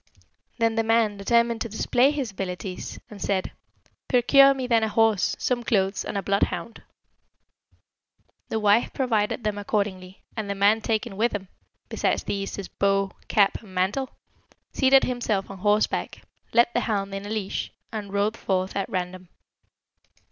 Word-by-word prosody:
"Then 230 -1 +2
the 225 0 +1
man 225 -2 +2
determined 235 +2 +2
to 230 - -2
display 245 +5 +2
his 280 -7 -2
abilities, 185 -1 -5
and 205 -2 -10
said, 190 -2 -1 0.6
'Procure 275 +2 +6
me 260 -1 -3
then 230 -2 +3
a 220 - +1
horse, 220 -3 +2
some 245 -1 -1
clothes, 195 -3 +1
and - - -4
a 195 - -2
bloodhound.' 200 +3 -1 1.7
The 220 - -1
wife 210 +2 +3
provided 230 -4 0
them 210 -1 -1
accordingly; 195 -3 -3
and 215 -3 -4
the 200 - -1
man 205 +3 +3
taking 220 -2 -2
with 235 +3 +1
him, 190 -2 -6 0.4
besides - - 0
these, 195 -1 -3
his 200 -2 -6
bow, 195 -1 0 0.2
cap, 200 -2 +2
and 195 -4 -14
mantle, 205 +9 0 0.6
seated 270 0 +5
himself 220 -6 -1
on 195 - -9
horseback, 210 +2 0 0.3
led 235 0 +5
the - - +2
hound 200 -3 -2
in 195 +1 -5
a - - -7
leash, 210 -3 -3 0.2
and 210 -3 -5
rode 205 +2 0
forth 190 -3 -2
at 195 - -2
random. 185 -1 -4
210 Hz, 155 wpm, -25 LUFS, 195-230 Hz, 1.7 s, Procure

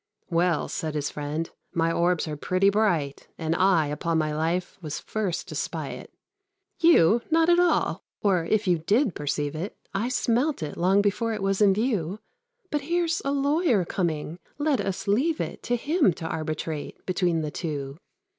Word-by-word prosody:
"Well," 170 -1 +2
said 155 -1 -4
his 145 -1 -1
friend, 150 +3 -3 0.3
"my 165 0 +1
orbs 170 0 +1
are 150 - -3
pretty 185 +6 +2
bright, 175 -10 0
And 160 0 -1
I, 185 -3 +4
upon 160 +3 -1
my 155 -1 0
life, 165 +5 -2
was 155 -3 -4
first 200 -6 -3
to - - -6
spy - - -3
it." - - -9 0.7
"You? 235 - +5
Not 325 +1 +3
at 345 0 +5
all; 355 -1 +2 0.2
or, 190 -5 +2
if 215 +5 +1
you 175 -2 +3
did 210 - +2
perceive 145 0 -2
it, 170 +7 -5 0.2
I 215 +5 -1
smelt 255 - +1
it 150 - -5
long 190 +3 +3
before 225 +3 0
it 210 -2 -4
was 195 +1 +1
in 195 -2 +5
view; 205 -5 -1 0.5
But 295 -1 0
here's 335 +2 0
a 275 - -1
lawyer 280 - +2
coming 165 -2 -2 0.2
let 290 -5 +1
us 195 -1 -3
leave 275 +11 +2
it - - -4
To 245 - 0
him 285 - +2
to 160 - -6
arbitrate 155 -1 -4
between 180 -3 +1
the 150 -1 -3
two." 145 -3 -4
185 Hz, 175 wpm, -26 LUFS, 160-230 Hz, 0.7 s, You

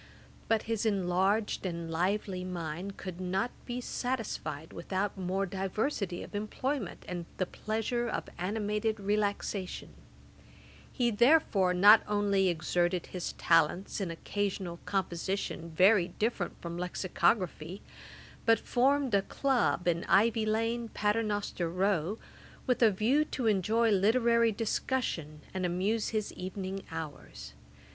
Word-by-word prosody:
But 225 -1 +2
his 225 -2 -1
enlarged 195 +1 +1
and 170 -3 -4
lively 185 +2 -1
mind 180 +1 -5
could 185 -1 -7
not 190 +6 -1 0.2
be 245 0 -3
satisfied 220 - -4
without 190 +4 -2
more 190 +1 -1
diversity 195 - -2
of - - -11
employment, 215 +2 -3
and 175 -2 -5
the 185 - +1
pleasure 225 +5 -2
of - - -3
animated 210 +3 -1
relaxation. 200 -2 -2 1.0
He 240 -2 +1
therefore 220 - +4
not 205 +4 +8
only 205 -2 +2
exerted 175 +2 0
his 180 -2 -3
talents 165 +5 +2
in 190 - -2
occasional 185 0 -3
composition 190 -2 -2
very 185 +3 +5
different 205 0 -2
from 170 0 -5
Lexicography, 180 -1 0 0.6
but 225 0 +5
formed 270 0 +2
a 200 - +5
club 250 -6 0
in 170 -1 +1
Ivy 215 +2 +3
lane, 225 +2 0
Paternoster 210 -5 -1
row, 185 +1 0 0.5
with 250 -1 +1
a 230 - +7
view 225 +9 +2
to 260 -4 -4
enjoy 220 +2 +3
literary 230 +3 +4
discussion, 200 - -2
and 185 -1 -2
amuse 190 +5 0
his 215 -2 -2
evening 190 +1 -5
hours. 160 -2 -7
200 Hz, 120 wpm, -31 LUFS, 180-225 Hz, 1.0 s, not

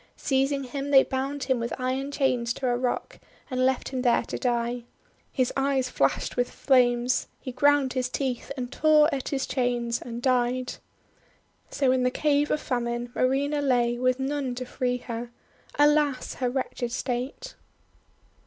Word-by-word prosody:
Seizing 275 0 +1
him, 275 +2 -5
they 270 -2 +7
bound 270 +1 -3
him 255 -1 +1
with 235 +2 -4
iron 260 +2 -2
chains 250 -4 +1
to 260 - -2
a 245 - +2
rock, 245 0 -2 0.3
and 255 0 0
left 260 0 +1
him 260 -2 -3
there 245 -2 +3
to - - -5
die. 240 -1 -1 0.5
His 255 -3 0
eyes 270 -2 +1
flashed 135 - 0
with 245 0 0
flames; 245 -2 +2
he 255 - -6
ground 280 +1 +3
his 255 -1 -1
teeth 260 -1 -3
and 245 -1 -4
tore 310 0 +4
at 270 -2 -3
his 270 -2 -1
chains, 240 -2 -1
and 235 0 -6
died. 250 0 +1 1.0
So 270 -3 +1
in 260 0 +2
the 250 - +3
Cave 295 +2 +1
of 300 - +1
Famine 240 -2 -2
Marina 280 +3 +1
lay 240 -3 +1
with 255 +1 +1
none 270 -2 -2
to 255 +1 -5
free 250 0 -1
her. 235 -1 -6 0.5
Alas! 295 -2 +3
her 250 -2 -1
wretched 245 -2 -3
state! 255 - -4
255 Hz, 160 wpm, -26 LUFS, 245-275 Hz, 1.0 s, they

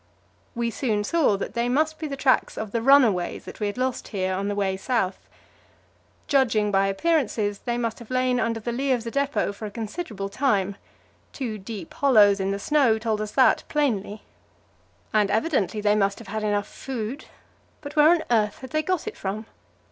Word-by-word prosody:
We 235 0 -1
soon 215 -4 -1
saw 280 -4 +2
that - - -5
they 235 +1 0
must 310 +4 +1
be 315 - -3
the 275 -1 -5
tracks 265 -1 +2
of 220 -2 -4
the 230 - -1
runaways 230 -9 +3
that - - -10
we 210 - 0
had 205 - -4
lost 255 0 -2
here 190 -3 -2
on 195 +2 -2
the 205 - -2
way 195 -2 0
south. 195 -2 -2 1.0
Judging 230 -7 +2
by 195 0 +3
appearances, 210 -3 0
they 240 0 -2
must 230 -2 -2
have 235 - -12
lain 255 -1 +1
under 230 0 0
the 235 +2 -4
lee 265 +3 0
of 240 -3 -1
the 230 - -5
depot 280 -6 0
for 215 +2 -7
a - - -6
considerable 215 - -5
time; 200 -4 0 0.6
two 230 -6 -4
deep 195 -3 -8
hollows 210 -8 +5
in 190 0 -1
the 200 - -1
snow 250 0 +3
told 220 -1 -1
us 210 0 -5
that 260 -2 +4
plainly. 220 -8 -1 0.9
And 210 -2 +3
evidently 220 - 0
they 205 0 +3
must 200 -1 +1
have 230 - -11
had 215 +2 -3
enough 205 -1 0
food, 255 +1 -6 0.6
but 290 0 -8
where 300 0 +6
on 345 -1 +3
earth 210 -3 +2
had 260 - -9
they 310 0 +1
got 360 +1 -1
it 435 - -4
from? 205 +3 -4
225 Hz, 195 wpm, -25 LUFS, 205-265 Hz, 1.0 s, where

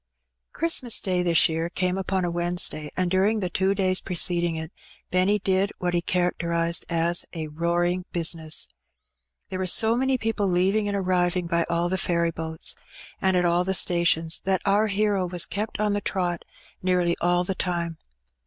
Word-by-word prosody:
Christmas 290 -7 +1
Day 180 -2 0
this 170 -1 +4
year 165 0 -2
came 180 0 -1
upon 190 -1 -1
a 175 - -2
Wednesday, 175 -3 0
and 180 -1 0
during 200 +4 +2
the 180 -3 -3
two 190 +2 +1
days 185 -1 +1
preceding 175 -2 0
it, 160 +1 -6 0.4
Benny 185 +3 +3
did 195 0 0
what 175 -1 -2
he 175 - +1
charac 180 0 -1
terized 170 0 -1
as 170 +1 +2
a 160 -3 -5
'^roaring 175 +3 -1
bizness." 165 -2 +2 0.8
There 185 -1 -4
were 185 - -1
so 225 +5 +4
many 265 +1 +1
people 225 -3 -1
leaving 190 +4 +1
and 200 0 -1
arriving 180 -1 0
by 170 0 0
all 170 +1 0
the 190 +1 -1
ferry 170 -1 0
boats 160 0 -2 0.5
and 190 -1 +2
at 180 - +2
all 175 +1 +2
the 190 +1 0
stations, 170 -2 +2
that 190 -1 0
our 205 +2 +3
hero 200 -2 0
was 175 -1 0
kept 210 +1 -4
on 210 -1 +1
the 205 - -1
trot 175 -4 -2 0.4
nearly 180 -2 +1
all 175 +1 +2
the 190 - -2
time. 170 -3 -3
180 Hz, 180 wpm, -25 LUFS, 170-190 Hz, 0.8 s, this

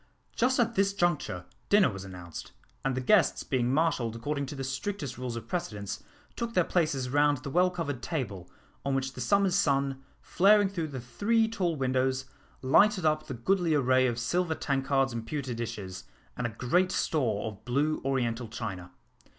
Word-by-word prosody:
Just 255 +2 +2
at 235 -1 +2
this 195 -1 +2
juncture 170 - 0 0.2
dinner 205 - +5
was 95 -1 -7
announced, 90 -4 -9 0.3
and 135 -1 0
the 130 - -1
guests 180 +5 +3
being 125 -2 0
marshalled 135 -7 +1
according 140 +4 -3
to 145 - -6
the 135 - -4
strictest 135 - -4
rules 125 -2 -4
of 115 - -7
precedence, 105 - -4 0.3
took 230 0 -4
their 180 - +5
places 145 -8 0
round 145 0 +3
the 140 +2 -7
well 180 +4 +4
covered 150 -8 -4
table, 105 - -4 0.3
on 140 -1 0
which 135 0 -1
the 125 - -7
summer's 200 +6 +3
sun, 140 -7 +1 0.2
flaring 205 +1 +4
through 170 -5 -3
the 135 -3 -6
three 210 - +1
tall 185 -7 -1
windows, 130 -1 0 0.4
lighted 185 +7 +4
up 155 0 +1
the 135 - -4
goodly 170 +6 +1
array 130 -2 +4
of 120 -1 -1
silver 165 +7 0
tankards 135 -2 0
and 115 -1 -5
pewter 140 -5 -3
dishes, 100 -5 -5 0.3
and 125 - -1
a - - -5
great 170 +12 +1
store 120 -14 0
of 110 -1 -7
blue 145 +5 0
oriental 125 -3 -1
china. 100 -6 -6
135 Hz, 175 wpm, -29 LUFS, 120-175 Hz, 0.4 s, dinner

